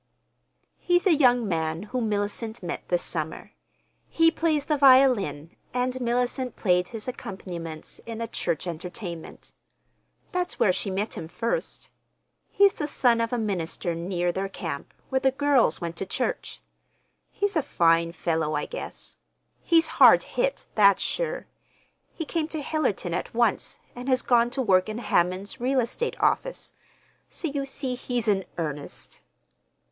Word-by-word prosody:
"He's 350 +1 +2
a 375 - +6
young 245 -6 +4
man 160 -1 -1
whom 225 +1 -2
Mellicent 210 +2 -3
met 175 - -5
this 175 -1 +1
summer. 160 -2 -4 0.6
He 330 0 +4
plays 315 -3 0
the 305 - +1
violin, 255 - +4 0.2
and 250 0 +1
Mellicent 245 +1 -1
played 180 -3 +2
his 225 -1 -7
accompaniments 175 -9 -7
in 230 -1 -5
a 230 - -2
church 175 -6 -2
entertainment. 175 0 -7 0.8
That's 360 0 -2
where 185 - +4
she 195 - -3
met 200 +3 -2
him 160 - -6
first. 230 +7 -3 0.6
He's 400 -1 +5
the 300 - -3
son 240 -5 +2
of 230 - -1
a 245 - 0
minister 180 -5 -2
near 175 +1 -1
their 195 +2 -3
camp, - - -6 0.2
where 265 - +2
the 265 0 +3
girls 270 - +3
went 170 0 -4
to 195 - -3
church. 250 +6 -3 0.7
He's 405 -1 -1
a 315 - +3
fine 165 -7 +2
fellow, 160 -2 -1
I 150 - -1
guess. - - -8 0.4
He's 330 -1 +4 0.2
hard - - +9
hit—that's 215 - +2
sure. - - -2 0.7
He 325 - -5
came 320 0 -1
to 315 -2 -5
Hillerton 255 - -1
at 175 - -4
once, 235 -3 +1 0.2
and 250 +2 -5
has 255 -1 +2
gone 240 -1 +4
to 265 +1 -1
work 185 -2 +3
in 215 - -4
Hammond's 185 -2 0
real 260 +2 +2
estate 255 - -2
office. - - 0 0.6
So 335 - -4
you 280 -1 -3
see 270 -1 -3
he's 245 -2 -3
in 195 -3 +2
earnest." 150 -4 -6
230 Hz, 150 wpm, -26 LUFS, 180-270 Hz, 0.8 s, hard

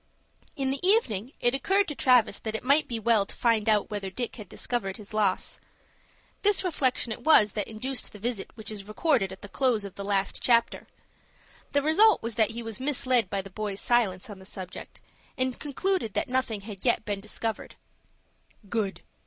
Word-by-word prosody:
In 270 -3 -1
the 275 - -2
evening, 275 - +2
it 240 - +2
occurred 390 +8 +2
to - - -3
Travis 250 -5 +3
that 220 -1 -4
it - - -3
might 280 +4 +4
be 235 - -3
well 225 -2 +3
to - - -9
find 225 -2 +2
out 215 0 +2
whether 200 -2 -3
Dick 240 +6 -4
had 210 -5 -10
discovered 195 -6 -2
his 210 0 -12
loss. 205 -3 0 0.8
This 410 -2 +4
reflection 260 -9 0
it - - -6
was 215 -10 +6
that 210 0 -3
induced 245 +3 -3
the - - -11
visit 220 -1 -3
which 220 -1 -7
is 205 -2 -8
recorded 215 - +1
at 190 - -10
the - - -6
close 230 -1 +1
of 195 - -8
the 200 - -6
last 200 -1 0
chapter. 235 -2 +2 0.9
The 285 0 +2
result 405 - +5
was 230 0 -3
that 215 -1 +2
he 235 +1 -6
was 225 0 -4
misled 255 -5 +1
by 195 -1 -2
the 195 - -11
boys' 205 0 -4
silence 215 -7 +1
on 205 -3 -9
the - - -13
subject, 185 -1 -8 0.4
and 255 -1 -1
concluded 300 - -1
that - - +1
nothing 250 -5 -1
had 200 -2 -9
yet 240 -3 +2
been 205 -1 -2
discovered. 215 +2 -4 0.9
"Good!" 210 -3 -2
225 Hz, 195 wpm, -27 LUFS, 205-260 Hz, 0.9 s, was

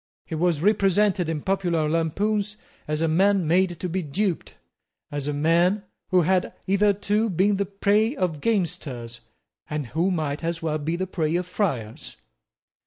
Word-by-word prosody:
He - - -8
was 165 -1 +1
represented 200 -3 +3
in 155 -3 -3
popular 175 -5 0
lampoons 200 +7 0 0.3
as 150 +1 -1
a - - +2
man 190 +2 +3
made 175 0 +2
to 180 - -2
be 185 +2 -2
duped, 175 +4 -2 0.6
as 145 -1 -3
a - - 0
man 170 +7 +2 0.3
who 185 -1 +4
had 185 +2 +1
hitherto 205 +2 +2
been 195 +3 +2
the 200 -1 -1
prey 205 +5 +2
of 170 - -2
gamesters, 155 - -2 0.5
and 150 -2 -2
who 170 +4 +2
might 155 -4 -2
as 165 0 -2
well 155 -2 -1
be 160 +3 -2
the 185 +2 -2
prey 165 -3 -1
of 180 +1 0
friars. 135 - -3
180 Hz, 160 wpm, -24 LUFS, 155-195 Hz, 0.6 s, who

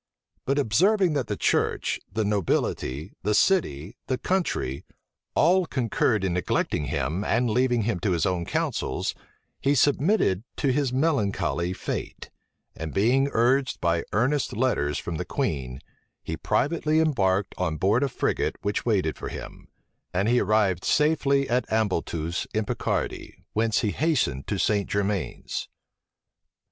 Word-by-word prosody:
But 140 +2 +1
observing 180 - +3
that 140 -5 -1
the - - -3
church, - - +1
the 110 - -1
nobility, 90 -6 -1
the 105 +3 +1
city, 105 - +1
the 130 - 0
country, 170 - -1 0.5
all 180 +2 +4
concurred 115 -5 +1
in 95 -2 0
neglecting 85 -3 0
him, 70 +8 -2
and 120 +3 +1
leaving 120 0 +2
him 105 -4 -1
to 95 +2 0
his 85 -3 +1
own 90 -2 0
counsels, - - -2 0.5
he 140 +1 +2
submitted 145 - +2
to 140 - +1
his 140 -2 +1
melancholy 115 - 0
fate; 95 - -5 0.4
and 80 -1 -6
being 130 +7 +3
urged 130 +4 +2
by 85 -1 +1
earnest 125 +1 0
letters 75 - +1
from 85 -2 -4
the - - -2
queen, 65 -4 -3 0.4
he 80 - -4
privately 155 - +1
embarked 100 - +1
on 80 - -1
board 105 - +2
a 140 - +1
frigate 125 - -1
which 100 0 -1
waited 95 -9 +1
for - - -5
him; - - -9 0.5
and 95 +3 +2
he 120 +1 +4
arrived 100 -4 +2
safety 140 -2 +2
at 125 0 0
Ambleteuse, 85 -6 -1
in 110 0 +1
Picardy, - - -3
whence 110 0 +1
he 105 - 0
hastened 120 - 0
to - - -1
St. 100 -2 +1
Germains. 100 -2 -2
110 Hz, 140 wpm, -26 LUFS, 90-135 Hz, 0.5 s, all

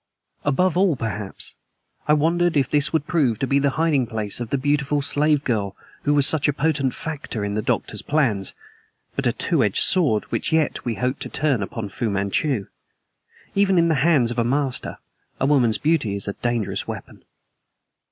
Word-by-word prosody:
Above 165 +5 +2
all, 185 -3 +3
perhaps, 110 -4 -5 0.5
I 150 - +5
wondered 170 +2 +2
if 135 -3 +2
this 145 +1 +1
would 160 -2 0
prove 145 - +1
to 135 - -1
be 140 +1 +2
the 140 0 +2
hiding 155 -6 +2
place 110 -2 -3
of 120 -2 -4
the 140 - 0
beautiful 145 +1 0
slave 150 0 +2
girl 100 -5 -1 0.3
who 145 0 +3
was 145 -1 +4
such 155 -1 +3
a 145 - +2
potent 140 -2 0
factor 145 -9 -4
in 100 - -3
the 110 - -1
Doctor's - - -2
plans, 120 -11 0 0.6
but - - 0
a - - +3
two - - +1
edged - - +3
sword 145 - +3
which - - -1
yet 160 -1 +1
we 120 -2 -1
hoped 125 +4 -2
to - - -4
turn 140 -6 0
upon 105 +2 -4
Fu 115 +3 -3
Manchu. 100 +4 0 0.9
Even 195 -2 +3
in 170 0 +4
the 155 -4 +1
hands 145 -8 +3
of 120 - -2
a - - +3
master, 135 +2 -1 0.4
a - - +1
woman's 130 -6 +3
beauty 145 -10 +1
is 100 - -1
a 100 - -2
dangerous 120 -2 -2
weapon. - - -8
140 Hz, 190 wpm, -22 LUFS, 115-155 Hz, 0.9 s, I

